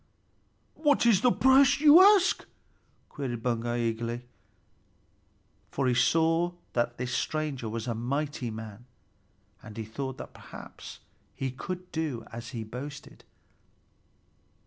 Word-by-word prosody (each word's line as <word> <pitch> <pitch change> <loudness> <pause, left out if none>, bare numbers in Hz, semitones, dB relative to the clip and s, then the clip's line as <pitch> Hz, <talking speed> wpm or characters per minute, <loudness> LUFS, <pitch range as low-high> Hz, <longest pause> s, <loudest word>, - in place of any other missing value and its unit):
"What 290 -5 +2
is 215 -5 +5
the 250 - +4
price 265 +2 +5
which - - -10
you 305 +3 +9
ask?" 395 -1 +5 0.6
queried 120 -5 -5
Baugi 120 -1 -1
eagerly, 120 +2 -5 1.4
for 135 -1 -1
he 125 - +3
saw 165 +6 +2 0.2
that 120 0 0
this 125 +1 -3
stranger 145 -7 -2
was 115 +1 -4
a 120 - 0
mighty 135 +2 -3
man, 110 +1 -8 0.8
and 110 0 -11
he 110 - -4
thought 130 +4 -5
that - - -9
perhaps - - -11 0.3
he 135 -1 -3
could 180 +7 -7
do 155 -7 -3
as 115 0 -7
he 115 -4 -5
boasted. 135 +6 -9
130 Hz, 125 wpm, -28 LUFS, 115-165 Hz, 1.4 s, you